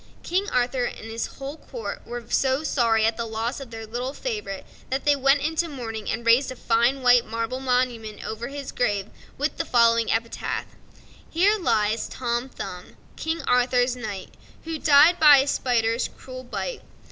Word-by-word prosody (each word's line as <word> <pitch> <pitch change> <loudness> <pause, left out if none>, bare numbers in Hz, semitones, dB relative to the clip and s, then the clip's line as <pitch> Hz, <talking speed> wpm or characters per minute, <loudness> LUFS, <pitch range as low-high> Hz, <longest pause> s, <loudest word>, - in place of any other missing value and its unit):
King 380 +4 -1
Arthur 250 0 +1
and 225 -1 -6
his 225 +1 -3
whole 275 +3 -6
court 475 +6 -7
were 240 -1 -6
so 265 +4 +1
sorry 230 -7 +2
at 225 0 +1
the 230 -1 -3
loss 225 +4 -3
of 270 -3 -9
their 225 -1 -7
little 245 +4 -4
favorite 210 -6 -4 0.2
that 265 +1 -2
they 290 -1 +5
went 275 +1 +3
into 320 +2 -1
mourning 225 -6 -5
and 230 +1 -3
raised 240 +4 +4
a - - -6
fine 240 +3 +1
white 245 -1 +6
marble 230 +3 -3
monument 250 -4 -1
over 225 +2 -4
his 280 -1 -6
grave 205 -4 -1 0.3
with 290 +3 -1
the - - 0
following 230 -1 +3
epitaph: 230 +1 -2 0.6
Here 400 +6 +3
lies 215 - +1
Tom 240 +1 -2
Thumb, 180 -7 -8 0.2
King 320 +1 -3
Arthur's 250 0 +2
knight, 210 -6 -6 0.3
Who 320 -1 -4
died 305 +5 +6
by 295 -2 +9
a 270 - +3
spider's 235 -4 +1
cruel 255 0 -10
bite. - - -4
245 Hz, 170 wpm, -24 LUFS, 230-275 Hz, 0.6 s, by